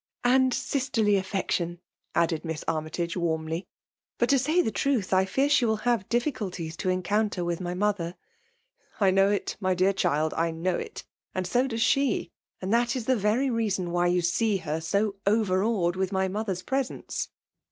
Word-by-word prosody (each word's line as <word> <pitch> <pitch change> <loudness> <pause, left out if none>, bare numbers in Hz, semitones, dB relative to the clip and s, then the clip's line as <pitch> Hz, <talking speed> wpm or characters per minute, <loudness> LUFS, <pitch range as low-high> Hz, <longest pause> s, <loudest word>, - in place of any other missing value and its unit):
• - - -73
" - - -52
And 260 -1 +4
sisterly 245 -6 +1
affection," 185 -3 -1 0.4
added 165 -2 +1
Miss 160 -2 -4
Army 155 -1 -1
tage 170 +1 -3
warmly. 160 0 -2 0.3
" - - -69
But 240 - +1
to 275 -1 +5
say 310 +7 +2
the 220 - -1
truth, 245 -9 0
I 190 0 +4
fear 270 +9 +1
she 290 - +4
will 220 -2 +2
have 235 -6 +1
difficulties 200 - -2
to 185 - -1
encounter 185 +1 0
with 170 +1 -2
my 175 0 -3
mother." 185 -3 -1 0.4
'' - - -44 0.3
I 195 -3 +4
know 195 +1 +4
it, 205 -1 -1
my 185 -2 +1
dear 185 +2 +3
child 155 -4 +1
— - - -9
I 165 +1 +2
know 165 +3 -1
it - - -6 0.2
— - - -44
and 185 -1 -1
no 250 +2 +3
does 225 -3 0
she; 255 -5 +1 0.3
and 190 +3 -2
that 240 +2 +2
is 245 -4 -3
the 260 - +3
very 230 +5 +1
reason 200 -6 -1
why 175 0 +2
you 180 0 +2
see 205 +4 +2
her 160 -3 -3
so 200 +5 0
overawed 200 -3 +2
in 190 - +1
my 190 -1 +1
mother's 190 -2 -3
pre^ 270 +5 +1
sence." 255 - -5
195 Hz, 205 wpm, -27 LUFS, 175-225 Hz, 0.4 s, to